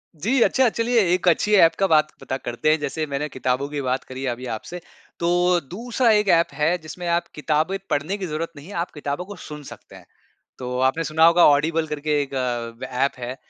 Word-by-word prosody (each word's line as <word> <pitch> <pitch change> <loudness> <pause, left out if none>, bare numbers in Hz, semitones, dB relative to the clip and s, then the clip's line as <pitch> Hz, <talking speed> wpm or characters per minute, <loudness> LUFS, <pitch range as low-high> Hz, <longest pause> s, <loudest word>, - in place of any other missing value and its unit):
जी, 230 - 0
अच्छा 260 -2 +3
चलिए 230 +1 +1
एक 180 0 0
अच्छी 210 +5 +3
ऐप 165 -3 +6
का 195 - +3
बात 155 -2 +4
पता 130 - -3
करते 120 +4 -2
हैं, 155 - +2
जैसे 150 +2 -3
मैंने 140 +2 -3
किताबों 130 +1 -1
की 145 -1 -3
बात 130 0 -1
करी 130 +1 -7
अभी 125 +1 -4
आपसे। 175 +10 -8 0.4
तो 175 +1 +2
दूसरा 235 +4 0
एक 210 -1 +3
ऐप 170 0 +4
है 160 +4 +1
जिसमें 175 +2 -9
आप 170 0 0
किताबें 155 +5 0
पढ़ने 155 +8 -1
की 190 -3 -4
जरूरत 165 +2 -4
नहीं 145 +5 -11
है, 205 - -9
आप 170 +1 -3
किताबों 145 +3 -4
को 205 +1 -9
सुन 150 -1 -9
सकते - - -13
हैं। - - -14 0.5
तो 125 0 -4
आपने 165 +5 -1
सुना 160 +1 +3
होगा 170 +1 +6
ऑडिबल 155 +2 +2
करके 150 0 -1
एक 140 -1 -6
अ, 120 -2 -3 0.2
ऐप - - -1
है। 125 +1 -5
155 Hz, 215 wpm, -23 LUFS, 140-180 Hz, 0.5 s, ऐप